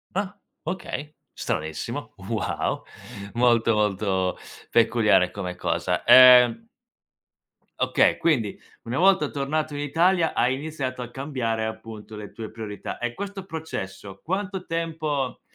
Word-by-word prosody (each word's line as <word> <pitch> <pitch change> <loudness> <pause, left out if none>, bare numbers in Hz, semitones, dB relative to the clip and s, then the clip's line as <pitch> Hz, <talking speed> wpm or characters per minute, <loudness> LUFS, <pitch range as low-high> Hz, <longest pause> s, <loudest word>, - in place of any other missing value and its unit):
Ah, 200 +1 -2 0.3
okay. 155 -4 -5 0.2
Stranissimo. 80 0 -4
Wow! - - -2 0.5
Molto, 120 -1 +3
molto 100 -3 0 0.3
peculiare 110 -5 +4
come 90 -3 -5
cosa. - - -1
Ehm 125 - +8 1.1
Okay. - - +3
Quindi, 125 -11 0 0.2
una 120 +2 -3
volta 190 -4 +4
tornato 150 +2 -2
in 145 - -3
Italia 165 +4 +2
hai 125 +2 +2
iniziato 135 -4 -4
a 120 - -10
cambiare 120 -5 -2
appunto 110 -1 -8
le 105 -2 -8
tue 110 -2 -7
priorità 110 -2 -6
e 120 0 -3
questo 200 - -6
processo 100 - -6
quanto 190 +1 -3
tempo 155 -5 -2
130 Hz, 115 wpm, -25 LUFS, 110-160 Hz, 1.1 s, Ehm